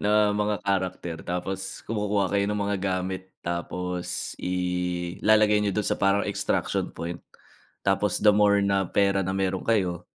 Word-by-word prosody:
na 105 0 +3
mga 105 0 +1
character, 90 -3 -1
tapos 95 +2 -4
kumukuha 105 -2 0
kayo 100 0 +3
ng 105 - -1
mga 100 0 0
gamit, 95 0 -2
tapos 90 +1 -3
ilalagay 90 +4 +1
niyo 105 - +1
do'n 105 - 0
sa - - +1
parang 100 +1 +3
extraction - - -1
point, 85 +1 -6 0.6
tapos 95 0 +2
the 105 -1 +6
more 105 -1 +5
na 100 -1 +2
pera 100 -1 +2
na 95 - -1
meron 95 -1 0
kayo, 90 -6 0
95 Hz, 145 wpm, -26 LUFS, 90-105 Hz, 0.6 s, the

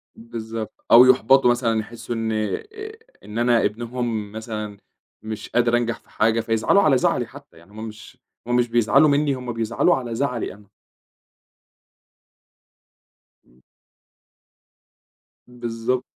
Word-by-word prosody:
بالضبط، 115 -1 -7
أو 120 +2 +10
يُحبَطوا 130 0 +5
مثلًا، 120 -2 0
يحسّوا 120 +2 -6
إن 115 -1 -2
آآ، 110 -1 -2 0.6
إن 105 +2 -8
أنا 120 -1 +3
ابنهم 115 -1 -3
مثلًا 110 -2 -6 0.4
مش 110 -1 -7
قادر 120 0 +2
أنجَح 120 -1 -2
في - - -30
حاجة 110 +1 +1
فيزعَلوا 115 - +2
على 140 -4 +4
زعَلي - - +1
حتى - - -15
يعني 85 +4 -19
هُم 110 +2 -7
مش، 110 0 -12 0.3
هُم 120 - +1
مش 120 0 +2
بيزعَلوا 120 +6 +4
منّي، 145 0 +2
هُم 125 -2 -5
بيزعَلوا 115 0 +1
على 120 -3 -4
زعَلي 125 -5 -2
أنا. 100 +1 -18 2.8
إمم. 60 +1 -27 1.9
بالضبط. 120 0 -3
115 Hz, 125 wpm, -22 LUFS, 110-125 Hz, 2.8 s, أو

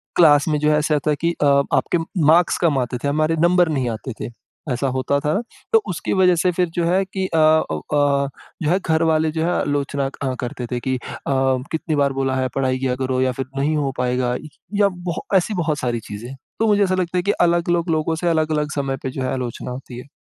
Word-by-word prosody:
Class 150 -4 +5
में 155 -1 +1
जो 150 - +2
है 150 - +3
ऐसा 150 +1 +1
होता 150 +1 0
है 150 - +2
कि 170 0 +2
अ - - +4 0.3
आपके 175 - +2 0.3
मार्क्स 165 +3 +4
कम 160 -6 +3
आते 125 0 -2
थे, - - 0
हमारे 155 +3 +1
नंबर 175 +1 +4
नहीं 135 -5 0
आते 115 +3 -5
थे - - -4 0.4
ऐसा 125 +3 -1
होता 130 +2 0
था। 150 +1 -1 0.4
तो 225 - +6
उसकी 180 - -2
वजह 185 -2 +4
से 180 - +2
फ़िर 180 0 0
जो 170 -2 +1
है 185 +3 +2
कि 190 0 -3
अ, 165 - -2 0.3
ओ 80 - -2
अ, 140 - +1 0.4
जो 150 - +1
है, 180 +3 +3
घरवाले 160 -1 +2
जो 160 0 -2
है 175 - +1
आलोचना 140 -1 -1 0.2
अ, 130 -2 -1
करते 125 0 -4
थे 125 - -1
कि 130 +1 -1
अ, - - -11 0.7
कितनी 160 -1 -1
बार 140 -1 +2
बोला 135 -1 -1
है 130 0 0
पढ़ाई 130 -1 +1
किया 130 -1 0
करो 130 0 -1
या 130 0 +2
फ़िर 135 +2 -4
नहीं 150 +3 +1
हो 140 -2 0
पाएगा। 125 0 0
इ 155 - -7 0.3
या 205 - +6 0.2
बहु 170 - -3 0.2
ऐसी 190 +4 0
बहुत 155 -2 -1
सारी 120 -2 -1
चीज़ें 115 +6 -7 0.3
तो 225 - +2
मुझे 205 -1 +4
ऐसा 185 -1 +1
लगता 180 -1 -1
है 180 - +2
कि 200 - +2
अलग-अलग 175 -1 +1
लोगों 160 +1 0
से 175 +2 -2
अलग-अलग 155 -2 0
समय 135 -2 -1
पर 130 - -2
जो 135 - -5
है 130 - -1
आलोचना 125 -1 -4
होती 125 -1 -8
हैं। 125 - -11
150 Hz, 235 wpm, -21 LUFS, 130-170 Hz, 0.7 s, तो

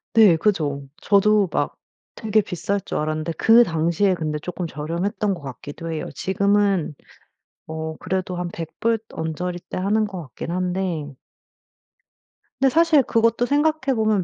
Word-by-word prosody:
네 210 -7 +7
그죠? 150 -8 0
저도 205 -1 +4
막 - - -1 0.4
되게 220 -1 +1
비쌀 200 +2 -2
줄 - - -3
알았는데 155 +2 -2
그 230 +7 +6
당시에 170 +2 +1
근데 155 -3 -2
쪼끔 175 +2 -5
저렴했던 170 +8 -2
것 175 - -8
같기도 145 +5 -7
해요. 160 - -3
지금은 200 -3 +1 0.7
어 160 0 -5
그래도 185 -1 -3
한 180 0 -3
100 165 -1 -7
불 230 -1 +1
언저리대 175 +3 -4
하는 210 +4 +1
것 190 -4 -5
같긴 150 +4 -7
한데 180 -5 -2 1.4
근데 270 - +4
사실 325 -4 +5
그것도 230 +1 +2
생각해 285 -1 +1
보면 215 -4 +2
185 Hz, 275 characters per minute, -22 LUFS, 160-215 Hz, 1.4 s, 네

